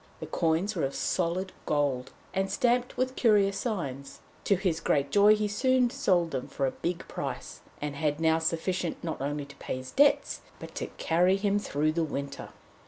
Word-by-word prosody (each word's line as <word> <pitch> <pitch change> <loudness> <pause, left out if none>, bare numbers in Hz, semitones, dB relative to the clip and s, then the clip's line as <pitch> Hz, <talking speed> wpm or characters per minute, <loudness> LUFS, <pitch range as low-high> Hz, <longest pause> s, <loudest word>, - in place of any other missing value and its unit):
The - - -5
coins 165 +6 0
were 170 - -1
of 135 0 -1
solid 185 +2 -1 0.2
gold, 140 -4 0 0.2
and 195 0 0
stamped 245 +4 +1
with 255 +1 0
curious 205 -4 +3
signs; 140 - -4 0.3
to 200 - +4
his 180 -4 0
great 140 -3 +1
joy 205 +1 +7
he 210 0 +1
very - - +1
soon 255 +3 +3
sold 175 -7 +2
them 130 -2 -3
for 135 - -2
a 130 - 0
big 175 0 -4
price, - - -5 0.2
and 145 -1 -4
had 150 0 0
now 160 0 +3
sufficient 165 +2 -1
not 160 -5 -4
only 145 +1 -2
to 140 0 -14
pay - - -4
his 130 0 -8
debts, 285 +1 +3 0.2
but - - -10
to - - -4
carry 180 +3 +3
him 200 0 +1
through 155 -5 0
the 165 +1 0
winter. 140 -2 -5
170 Hz, 190 wpm, -29 LUFS, 145-200 Hz, 0.3 s, joy